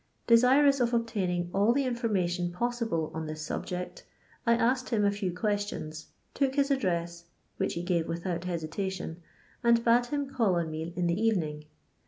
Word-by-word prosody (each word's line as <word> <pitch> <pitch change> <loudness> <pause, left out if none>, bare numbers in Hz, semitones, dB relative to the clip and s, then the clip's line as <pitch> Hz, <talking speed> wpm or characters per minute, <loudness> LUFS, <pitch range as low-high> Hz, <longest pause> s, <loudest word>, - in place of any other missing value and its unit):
Desirous 265 +4 +5
of 240 -1 +2
obtaining 185 -7 -1
all 205 +4 +4
the 275 +1 +1
information 190 -8 0
possible 225 -6 -1
on 160 0 -4
this 155 0 -5
subject, 180 +3 -5 0.4
I 235 - +6
asked 250 +2 +1
him 215 -4 +2
a 200 - +4
few 200 -2 -2
questions, 190 -5 -3 0.3
took 270 -1 0
his 280 0 +2
address, 170 -8 -1 0.3
which - - -1
he 170 - -3
gave 175 -2 0
without 170 +1 -3
hesitation, 175 +1 -4 0.4
and 235 0 +4
bade 240 +1 +4
him 285 +1 -2
call 235 -9 +1
on 165 -2 -1
me 160 +2 -4
in 180 - 0
the 170 +4 0
evening. 160 -9 0
195 Hz, 165 wpm, -29 LUFS, 170-235 Hz, 0.4 s, I